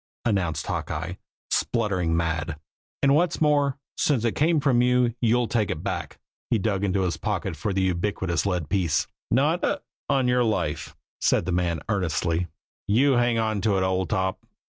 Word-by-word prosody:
announced 90 -9 0
Hawkeye, - - -3 0.4
spluttering 95 -8 +1
mad. 80 -2 -2 0.4
"And 140 0 +5
what's 170 +4 +2
more, 145 -3 +2 0.2
since 130 -6 +1
it 115 - +2
came 160 +5 +2
from 135 -4 +3
you, 125 -1 +3
you'll 120 0 +3
take 110 -4 0
it - - -3
back!" - - -4 0.3
He - - +3
dug 100 -1 -1
into 95 -1 +1
his 90 -2 -1
pocket - - -2
for 105 - -2
the 95 0 0
ubiquitous 95 -1 0
lead 90 -6 -1
piece. 90 -5 +1 0.2
"Not - - +2
hic! - - 0 0.3
on 130 -2 +2
your 125 0 +3
life!" 110 -2 -1 0.2
said - - +2
the 95 - -1
man 85 -3 0
earnestly. 85 -3 0 0.4
"You 130 +8 +4
hang 120 -2 +3
on 110 -2 0
to 105 -2 +2
it, 95 - +1
old 95 -2 0
top. 95 0 -1
100 Hz, 170 wpm, -25 LUFS, 90-120 Hz, 0.4 s, And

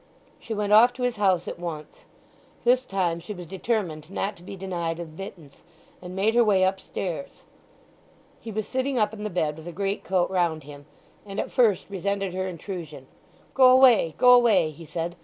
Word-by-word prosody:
She 225 - -5
went 210 0 0
off 240 +3 +7
to 250 0 -6
his 245 -2 0
house 190 -4 +2
at - - -6
once. 160 -3 -7 0.6
This 250 +1 +3
time 180 -5 -1
she 210 +5 -8
was 175 -1 -8
determined 180 -4 -3
not 195 +1 -3
to - - -17
be 190 +2 -9
denied 175 -3 -3
admittance, 165 -2 -10 0.4
and 180 0 -8
made 205 +4 +2
her 240 0 +5
way 200 -4 +3
upstairs. 190 +4 -3 1.0
He 225 - -8
was 215 0 -3
sitting 260 0 -1
up 210 -1 +1
in 210 -1 -7
the 210 - -2
bed 155 -5 -1
with 160 +1 -11
a - - -5
greatcoat 195 -1 -1
round 170 -4 0
him, 145 0 -12 0.4
and 200 0 -6
at - - -3
first 225 -7 +3
resented 195 -1 -2
her 185 0 -2
intrusion. 170 -6 -7 0.5
"Go 260 -1 +6
away—go 250 - +6
away," 215 -10 +4
he 160 +2 -13
said. 170 +2 -4
190 Hz, 180 wpm, -25 LUFS, 170-215 Hz, 1.0 s, off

